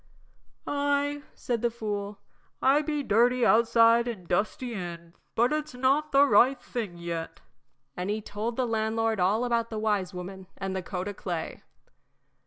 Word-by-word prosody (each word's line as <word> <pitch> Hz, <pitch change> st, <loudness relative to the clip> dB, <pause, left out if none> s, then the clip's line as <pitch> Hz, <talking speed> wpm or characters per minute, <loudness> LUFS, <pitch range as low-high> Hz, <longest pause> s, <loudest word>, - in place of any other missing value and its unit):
"Ay," 285 Hz, 0 st, 0 dB
said 235 Hz, -3 st, -2 dB
the 240 Hz, -, +2 dB
fool, 210 Hz, -3 st, -4 dB, 0.4 s
"I 275 Hz, +3 st, +4 dB
be 300 Hz, -1 st, -2 dB
dirty 240 Hz, +2 st, +3 dB
outside 230 Hz, +1 st, +5 dB
an' 210 Hz, -7 st, -5 dB
dusty 215 Hz, +7 st, -1 dB
in, 170 Hz, -4 st, -7 dB, 0.2 s
but 240 Hz, +5 st, +3 dB
it's 305 Hz, -3 st, -3 dB
not 275 Hz, +4 st, +1 dB
the 280 Hz, 0 st, +6 dB
right 265 Hz, -1 st, +5 dB
thing 215 Hz, -8 st, -5 dB
yet." 170 Hz, -1 st, -5 dB, 0.6 s
And 180 Hz, +2 st, -3 dB
he 210 Hz, +1 st, 0 dB
told 215 Hz, +2 st, -4 dB
the 255 Hz, -, 0 dB
landlord 225 Hz, -1 st, 0 dB
all 205 Hz, +7 st, +2 dB
about 235 Hz, -1 st, 0 dB
the 220 Hz, -, -5 dB
wise 205 Hz, -4 st, 0 dB
woman 185 Hz, +1 st, -8 dB
and 195 Hz, -1 st, -4 dB
the 190 Hz, -, -2 dB
coat 180 Hz, +1 st, -4 dB
o' 205 Hz, -, -3 dB
clay. 175 Hz, -4 st, -5 dB
225 Hz, 160 wpm, -28 LUFS, 195-250 Hz, 0.6 s, the